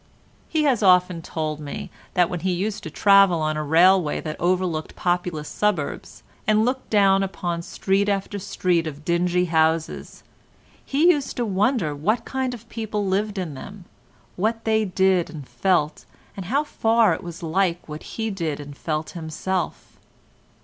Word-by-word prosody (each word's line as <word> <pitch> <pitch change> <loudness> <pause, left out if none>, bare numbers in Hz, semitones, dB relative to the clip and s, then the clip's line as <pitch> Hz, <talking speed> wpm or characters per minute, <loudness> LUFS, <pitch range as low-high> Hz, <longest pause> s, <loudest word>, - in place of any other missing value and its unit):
He 315 -1 +1
has 265 -7 +2
often 180 -3 +4
told 155 -2 -4
me 145 -2 -7 0.2
that 180 -1 +4
when 180 -1 -4
he 185 +2 -1
used 200 +4 -2
to 160 - -7
travel 195 0 +5
on 155 0 0
a 155 - -2
railway 165 +2 +4
that 155 - -5
overlooked 175 -3 -1
populous 175 -4 -1
suburbs, 205 -9 -2 0.2
and 215 +1 +4
looked 260 +1 -2
down 195 -2 +4
upon 175 -3 -3
street 195 +3 0
after 200 0 -2
street 175 -3 0
of 150 0 -8
dingy 180 +1 +1
houses, 160 -1 0 0.6
he 310 +6 +4
used 290 -5 -2
to 240 - 0
wonder 200 - +1
what 215 +11 0
kind 260 -2 -2
of 230 -1 -14
people 215 -3 -3
lived 200 +2 -1
in 175 -5 -3
them, 195 +7 -10 0.5
what 225 +4 -1
they 220 -1 +2
did 190 -2 +2
and 145 -5 -9
felt, 170 -6 0 0.3
and 195 - -6
how 280 +8 +1
far 225 - +2
it - - -4
was 175 +1 -8
like 175 +1 0
what 150 0 -7 0.2
he 225 -1 -1
did 165 -7 -3
and 145 -1 -9
felt 155 +1 -3
himself. 170 +2 -4
185 Hz, 165 wpm, -23 LUFS, 165-210 Hz, 0.6 s, travel